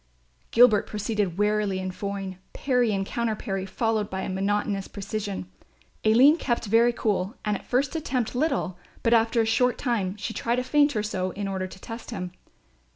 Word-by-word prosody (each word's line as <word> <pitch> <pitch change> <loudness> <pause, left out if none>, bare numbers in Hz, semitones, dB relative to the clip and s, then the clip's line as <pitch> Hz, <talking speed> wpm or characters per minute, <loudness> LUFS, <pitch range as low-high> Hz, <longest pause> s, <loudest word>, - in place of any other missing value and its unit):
Gilbert 230 -3 +5
proceeded 210 -4 -2
warily 210 -1 +1
and 185 0 -4
foyne, 195 -1 -5
parry 250 -4 +1
and 195 -1 -1
counterparry 215 -4 -2
followed 220 0 -1
with 190 0 -3
monotonous 195 +1 -1
precision. 200 - -4 0.6
Aline 255 +9 +6
kept 240 -6 -1
very 230 +3 +4
cool 210 -2 -1
and 210 -1 +1
at - - -8
first 270 +4 +1
attempted 260 -7 -1
little; 255 - -1 0.2
but 230 - +3
after 230 0 +4
a - - +1
short 250 +3 +2
time 210 -7 -1
she 225 +2 -4
tried 235 +2 -1
a 250 - 0
feint 290 +1 +3
or 210 - 0
so 185 -3 -2
in 200 0 -4
order 190 -1 -2
to 185 - -12
test 230 +3 -8
him. 185 -6 -5
215 Hz, 170 wpm, -26 LUFS, 195-235 Hz, 0.6 s, Aline